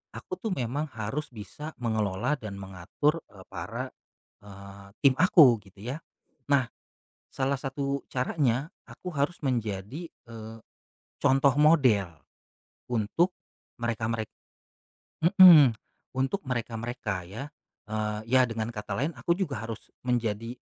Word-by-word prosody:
aku 185 - -7
tuh 215 -2 -2
memang 135 +5 -2
harus 125 +8 -3
bisa 130 +8 -9
mengelola 110 +3 -1
dan 105 -3 -7
mengatur, 95 - -1
eee, 95 -2 -15
para, - - -5 0.5
eee, 100 0 -12 0.2
tim 135 -2 +7
aku 145 - +7
gitu 95 +1 -16
ya, 125 +5 -3 0.5
nah, 130 -4 +3 0.6
salah 135 +1 -1
satu 140 0 -2
caranya 130 0 0 0.2
aku 180 -1 -8
harus 145 +4 0
menjadi, 120 - -2
eee, 115 -1 -11 0.7
contoh 135 0 +4
model, 130 - +4 0.8
untuk, 125 - +1 0.4
mereka 115 -2 -2
merek 110 -2 -2 0.9
mmm, 170 - +9 0.4
untuk 135 +10 -1
mereka-mereka 115 -5 -3
ya, 105 +9 -7 0.4
eee, 105 0 -2
ya 130 +1 +5
dengan 115 -2 -3
kata 105 -1 -5
lain 150 +6 0
aku 130 +8 0
juga 140 - -2
harus 115 -1 -7 0.2
menjadi 115 -2 -1
120 Hz, 120 wpm, -28 LUFS, 110-140 Hz, 0.9 s, mmm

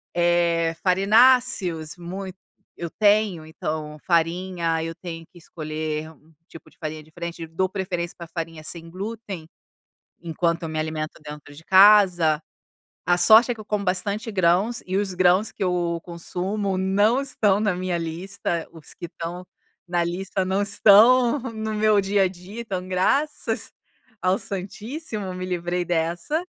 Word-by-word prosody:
eh, 170 -1 +2
farináceos 195 -4 +3
muito 185 +2 -7 0.4
eu 170 -1 -5
tenho, 205 -5 +2
então, 155 -1 -5
farinha, 170 -1 0
eu 165 0 -4
tenho 165 -1 -8
que 175 - -17
escolher 155 -1 -5
um 160 +1 -23 0.2
tipo 165 - -14
de - - -28
farinha 155 -1 -5
diferente. 165 +2 -7
Dou 170 +4 -1
preferência 180 -3 -3
pra 170 - -9
farinha 165 -1 -6
sem 165 +1 -8
glúten, 195 -2 -6 0.7
enquanto 170 0 -1
eu 165 - -3
me 155 0 -4
alimento 155 0 -4
dentro 150 -1 -10
de 155 +3 -14
casa. 185 -6 +6 0.7
A 175 +1 +3
sorte 220 +7 +7
é - - -5
que 225 - -12
eu - - -9
como 210 -1 -2
bastante 200 +4 -1
grãos 190 +5 +2
e 185 +1 -2
os 200 -2 0
grãos 185 +3 +3
que - - -7
eu 175 -2 0
consumo 185 +3 -3
não 205 +6 +2
estão 210 -7 +1
na 210 -3 +1
minha 180 -1 -2
lista. 170 0 -4
Os 160 -2 -13
que - - -10
estão 175 +2 -7 0.4
na 175 -1 0
lista 190 +2 -2
não 190 +2 0
estão 230 +6 +5
no 220 -4 -5
meu 215 -1 +3
dia 195 0 +2
a - - +2
dia, 185 +5 -10
então, 185 -5 -5
graças 240 +5 0 0.5
ao 185 +2 +2
santíssimo, 205 - -5
me 185 0 -5
livrei 175 0 -2
dessa. 175 - -1
180 Hz, 150 wpm, -23 LUFS, 165-205 Hz, 0.7 s, sorte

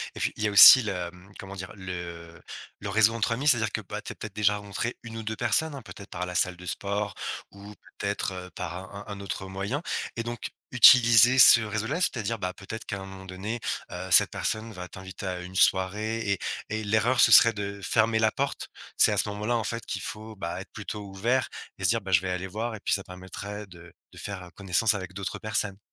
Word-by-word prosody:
Et - - -8
puis - - -1
il 110 - -4
y - - +2
a - - -2
aussi 130 +6 +11
le, 110 - -3
hem, 90 +2 -8
comment 100 0 -9
dire? 95 -1 -8
Le 85 -3 -8 0.4
le 100 - -6
réseau 110 +2 +4
entre 115 +1 -1
amis, 135 +5 -3
c'est-à-dire 115 -6 +4
que 110 - -3
bah 105 +2 -7
tu - - -8
as - - -25
peut-être 110 -2 -9
déjà 105 0 +2
rencontré 105 +3 -5
une 115 -1 -8
ou 110 - -6
deux 110 +1 -4
personnes 125 +7 +1
hein 135 - -8
peut-être 100 -2 -12
par 90 - -5
la 90 0 -7
salle 90 0 +1
de 90 - -12
sport 100 +2 -3 0.4
ou 100 +1 -12 0.3
peut-être, 100 -1 -2
heu, 90 0 -8
par 85 - -6 0.2
un 100 - -8
un 105 - -6
un 100 - -9
autre 95 -1 -6
moyen? 100 - -4 0.3
Et 115 - -3
donc 120 0 -5 0.2
utiliser 120 0 +7
ce 120 -2 +10
réseau 110 +1 -3
là 160 +6 -2
c'est-à-dire 115 - -1
ben 90 -2 -4
peut-être 110 +4 -9
qu'à 100 - -5
un 95 - -8
moment 95 0 -11
donné, 95 +5 -5 0.3
heu, - - -7
cette - - +6
personne 110 +1 -3
va 90 -3 -8
t'inviter 95 +2 -10
à 90 -1 -4
une 90 +1 -10
soirée 105 +5 +1
et 100 - -1 0.3
et 110 +1 -3
l'erreur 110 +4 +1
ce - - +6
serait 115 - +8
de 100 -1 -6
fermer 110 0 +2
la 110 -1 +2
porte. 140 +1 -4 0.3
C'est - - +6
à - - -1
ce - - +1
moment 105 +1 -6
là 120 +2 +1
en 115 - -2
fait 115 +1 -4
qu'il - - -5
faut 110 +1 -7
ben 85 -2 -5
être 95 - -9
plutôt 105 0 -7
ouvert 115 +7 -1 0.3
et - - -9
se - - +3
dire 115 0 +1
bah 95 -1 -7
je 85 - +4
vais 95 - -4
aller 90 +1 -4
voir 110 +4 -4
et 105 - -10
puis - - -1
ça 100 - -1
permettrait 100 +3 -8
de 85 -1 -15 0.2
de - - -16
faire 95 -3 -7
connaissance 100 +3 +2
avec 95 -2 -7
d'autres 95 0 -5
personnes. 105 -2 -2
105 Hz, 245 wpm, -26 LUFS, 95-110 Hz, 0.4 s, aussi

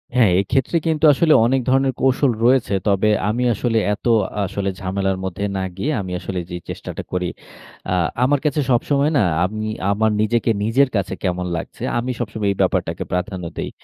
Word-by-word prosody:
হ্যাঁ, 115 -7 +5
এক্ষেত্রে 130 - 0
কিন্তু 160 -1 +2
আসলে 155 +2 +3
অনেক 130 +2 +2
ধরনের 135 0 +2
কৌশল 135 0 +3
রয়েছে। 125 -4 +3
তবে 100 +1 +3 0.2
আমি 120 +4 0
আসলে 115 +2 -1 0.2
এত 105 - -9 0.4
আসলে 100 0 -2
ঝামেলার 95 0 -1
মধ্যে 95 +2 -4
না 95 - -1
গিয়ে, 140 +11 -1
আমি 95 -2 -6
আসলে 95 0 -4
যেই 90 0 -6
চেষ্টাটা - - -6
করি, 90 -1 -1 0.6
আ - - +2 0.3
আমার 140 +2 +3
কাছে 150 0 +1
সবসময় 140 +5 +2
না, 110 - +4 0.2
আমি 110 +3 -4 0.2
আমার 110 +1 +2
নিজেকে 115 +2 +1
নিজের 130 +5 +3
কাছে 95 -2 -1
কেমন 90 -1 -1
লাগছে, - - -7 0.2
আমি 125 +2 -2
সবসময় 105 -3 -2
এই - - -3
ব্যাপারটাকে - - 0
প্রাধান্য 90 0 -2
দেই। - - -3
110 Hz, 175 wpm, -20 LUFS, 95-130 Hz, 0.6 s, হ্যাঁ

